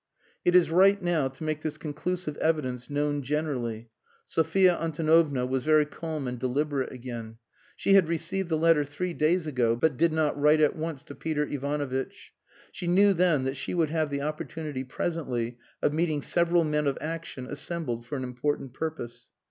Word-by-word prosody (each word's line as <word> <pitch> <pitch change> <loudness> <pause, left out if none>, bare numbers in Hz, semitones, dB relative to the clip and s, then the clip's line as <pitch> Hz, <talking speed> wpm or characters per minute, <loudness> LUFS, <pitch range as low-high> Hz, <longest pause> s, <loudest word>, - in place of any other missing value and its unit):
"It 175 - +3
is 175 -3 +5
right 195 +4 +5
now 175 -7 +1
to 135 +3 -9
make 155 -1 -2
this 155 -1 -3
conclusive 155 +1 -3
evidence 130 -6 -1
known 145 0 0
generally." 125 -6 -3 0.3
Sophia 175 +3 +3
Antonovna 155 -4 +2
was 130 +1 -1
very 155 +1 +4
calm 155 -2 -5
and 125 -1 -4
deliberate 135 +2 -1
again. 120 -3 -7 0.4
She 195 - +2
had 190 -5 +6
received 170 +3 -2
the 160 - +1
letter 165 -1 +4
three 160 +5 -4
days 165 +2 +2
ago, 125 -6 +1
but 135 +2 +1
did 165 +1 +3
not 155 -1 +1
write 150 +2 +4
at 150 -1 +3
once 155 -3 -4
to - - -10
Peter 150 -2 -1
Ivanovitch. 140 -2 -3 0.4
She 175 - -5
knew 195 +3 +5
then 170 -6 +2
that 135 +1 -2
she 140 - -3
would 160 -3 +1
have 155 -2 0
the 140 0 -2
opportunity 150 -2 -4
presently 125 -5 -3 0.2
of 145 - +2
meeting 155 -3 0
several 170 0 +3
men 150 -1 0
of 140 - 0
action 160 -4 -5
assembled 145 -5 -4
for 145 - -4
an 130 - -3
important 130 +1 -2
purpose. 120 -6 -5
150 Hz, 175 wpm, -27 LUFS, 135-165 Hz, 0.4 s, had